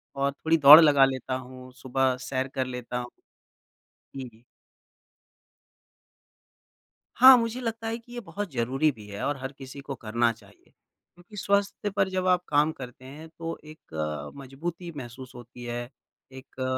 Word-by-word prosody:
और 140 Hz, 0 st, 0 dB
थोड़ी 160 Hz, +3 st, +1 dB
दौड़ 145 Hz, +1 st, +11 dB
लगा 145 Hz, -3 st, +6 dB
लेता 130 Hz, -1 st, -3 dB
हूँ, 130 Hz, 0 st, -9 dB
सुबह 130 Hz, 0 st, 0 dB
सैर 130 Hz, +1 st, -3 dB
कर 130 Hz, -1 st, -3 dB
लेता 125 Hz, -1 st, -5 dB
हूँ। 120 Hz, -, -6 dB, 1.1 s
जी, 135 Hz, -, -5 dB
जी। 110 Hz, +2 st, -24 dB, 2.7 s
हाँ, 260 Hz, 0 st, +9 dB
मुझे 230 Hz, +1 st, -2 dB
लगता 225 Hz, -1 st, -4 dB
है 225 Hz, +1 st, -2 dB
कि 240 Hz, +1 st, -16 dB
ये 240 Hz, -, -5 dB
बहुत 200 Hz, -2 st, -6 dB
ज़रूरी 130 Hz, +5 st, +1 dB
भी 110 Hz, -5 st, -14 dB
है 100 Hz, 0 st, -7 dB
और 145 Hz, -, -1 dB
हर 130 Hz, 0 st, -6 dB
किसी 135 Hz, +1 st, -10 dB
को 135 Hz, -1 st, -6 dB
करना 115 Hz, +1 st, 0 dB
चाहिए। 105 Hz, -2 st, -22 dB
क्योंकि 175 Hz, +4 st, -20 dB
स्वास्थ्य 200 Hz, +1 st, 0 dB
पर 195 Hz, -1 st, 0 dB
जब 185 Hz, 0 st, -2 dB
आप 180 Hz, -1 st, +3 dB
काम 150 Hz, +1 st, +3 dB
करते 130 Hz, -3 st, -11 dB
हैं 150 Hz, +5 st, -10 dB
तो 165 Hz, 0 st, -4 dB
एक 75 Hz, -, -6 dB
मज़बूती 165 Hz, +6 st, -7 dB
महसूस 130 Hz, 0 st, -9 dB
होती 120 Hz, 0 st, -12 dB
है। 120 Hz, 0 st, -5 dB, 0.4 s
एक 130 Hz, 0 st, -14 dB
अ, 130 Hz, -, -1 dB
135 Hz, 160 wpm, -26 LUFS, 125-170 Hz, 2.7 s, दौड़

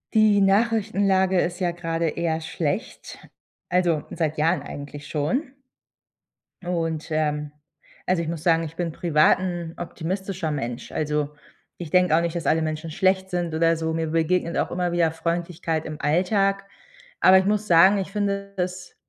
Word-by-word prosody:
Die 215 Hz, -2 st, +5 dB
Nachrichtenlage 195 Hz, -2 st, +2 dB
ist 175 Hz, +1 st, -1 dB
ja 180 Hz, -, +1 dB
gerade 165 Hz, -1 st, -2 dB
eher 165 Hz, 0 st, -1 dB
schlecht, 160 Hz, -2 st, -4 dB, 0.5 s
also, 175 Hz, -4 st, +2 dB
seit 155 Hz, -2 st, -2 dB
Jahren 160 Hz, -1 st, +2 dB
eigentlich 145 Hz, 0 st, -8 dB
schon. 180 Hz, -, -1 dB, 1.1 s
Und 165 Hz, -3 st, -2 dB
ähm, 150 Hz, -1 st, -1 dB, 0.5 s
also, 180 Hz, -2 st, +1 dB
ich 165 Hz, -, -4 dB
muss 165 Hz, -1 st, -4 dB
sagen, 165 Hz, -1 st, +3 dB
ich 160 Hz, 0 st, -7 dB
bin 170 Hz, -1 st, -2 dB
privat 155 Hz, 0 st, +3 dB
'n 175 Hz, -3 st, -4 dB
optimistischer 180 Hz, 0 st, -4 dB
Mensch. 125 Hz, -4 st, -4 dB
Also, 150 Hz, -1 st, -1 dB, 0.5 s
ich 170 Hz, -3 st, -7 dB
denke 180 Hz, -3 st, +4 dB
auch 165 Hz, -, +3 dB
nicht, 170 Hz, 0 st, -2 dB
dass 170 Hz, -, -3 dB
alle 160 Hz, +1 st, +3 dB
Menschen 155 Hz, +1 st, -3 dB
schlecht 190 Hz, +3 st, +1 dB
sind 175 Hz, -3 st, -2 dB
oder 165 Hz, +1 st, +2 dB
so, 160 Hz, 0 st, -2 dB
mir 165 Hz, 0 st, -1 dB
begegnet 165 Hz, +2 st, 0 dB
auch -, -, -1 dB
immer 175 Hz, 0 st, -1 dB
wieder 170 Hz, -2 st, +2 dB
Freundlichkeit 165 Hz, 0 st, -2 dB
im 155 Hz, -1 st, -7 dB
Alltag. 195 Hz, +5 st, +1 dB, 0.6 s
Aber 190 Hz, 0 st, +7 dB
ich 190 Hz, -, +2 dB
muss 210 Hz, +1 st, 0 dB
sagen, 185 Hz, +3 st, +6 dB
ich 190 Hz, 0 st, -4 dB
finde 200 Hz, -1 st, -2 dB
das, 180 Hz, 0 st, -4 dB
170 Hz, 160 wpm, -24 LUFS, 160-185 Hz, 1.1 s, Aber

